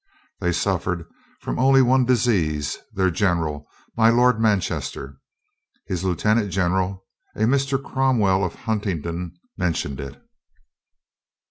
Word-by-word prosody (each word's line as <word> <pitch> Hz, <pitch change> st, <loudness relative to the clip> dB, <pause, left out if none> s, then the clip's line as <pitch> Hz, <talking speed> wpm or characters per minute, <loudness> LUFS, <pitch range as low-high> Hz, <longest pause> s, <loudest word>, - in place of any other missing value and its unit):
They 90 Hz, -2 st, 0 dB
suffered 90 Hz, -1 st, -1 dB, 0.4 s
from -, -, -4 dB
only 135 Hz, 0 st, +5 dB
one 130 Hz, +1 st, +3 dB
disease 90 Hz, -, +1 dB
— -, -, -37 dB
their 95 Hz, -1 st, +2 dB
general, 80 Hz, -5 st, -1 dB, 0.3 s
my 115 Hz, 0 st, +5 dB
Lord 120 Hz, 0 st, +4 dB
Manchester. 90 Hz, -9 st, -1 dB, 0.7 s
His 90 Hz, -1 st, -3 dB
lieutenant 105 Hz, +4 st, +1 dB
gen 90 Hz, -2 st, +1 dB
eral, 95 Hz, 0 st, -1 dB, 0.3 s
a -, -, -6 dB
Mr. 135 Hz, +4 st, +2 dB
Cromwell 120 Hz, -9 st, +1 dB
of 90 Hz, -, -2 dB
Huntingdon, 90 Hz, -5 st, -3 dB, 0.2 s
mentioned 80 Hz, -6 st, -2 dB
it. 70 Hz, 0 st, -8 dB
95 Hz, 120 wpm, -23 LUFS, 85-115 Hz, 0.7 s, only